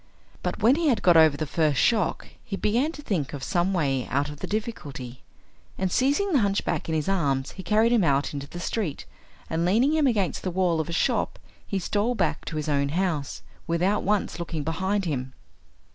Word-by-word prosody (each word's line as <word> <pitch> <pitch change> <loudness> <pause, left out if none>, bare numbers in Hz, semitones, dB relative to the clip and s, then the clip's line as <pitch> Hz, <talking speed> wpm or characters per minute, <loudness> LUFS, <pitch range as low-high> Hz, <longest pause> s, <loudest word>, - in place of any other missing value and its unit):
But - - -3
when 250 +6 +5
he 335 -1 +1
had 250 -6 +2
got 175 -2 +6
over 160 -3 +6
the 155 - -2
first 150 -2 +1
shock 215 -7 +1
he 200 - -4
began 235 +10 +1
to 295 - -10
think 165 - -2
of 140 -2 -6
some 180 +2 +1
way 140 -8 0
out 140 +2 0
of 150 -1 -9
the - - -4
difficulty, 150 - -5 0.6
and 190 -1 -1
seizing 285 - +2
the 290 - +4
hunchback 200 -5 0
in 160 - 0
his 155 -2 -1
arms 140 -9 0
he 190 - -8
carried 215 +5 +3
him 235 -5 +4
out 140 -2 +1
into 140 -1 -5
the 175 - -8
street, 175 -4 -3 0.4
and 165 +1 -1
leaning 230 - +3
him 310 -3 +3
against 205 -7 0
the 185 - -2
wall 180 -2 +1
of 160 - -2
a - - -3
shop 165 - 0 0.3
he 195 - -1
stole 205 +6 0
back - - -1
to 165 - -5
his 150 - -3
own 140 -1 +1
house, 160 -3 -2 0.2
without 180 +5 +1
once 200 -5 0
looking 165 -3 -4
behind 190 +5 -1
him. 130 -5 -3
175 Hz, 205 wpm, -26 LUFS, 150-210 Hz, 0.6 s, got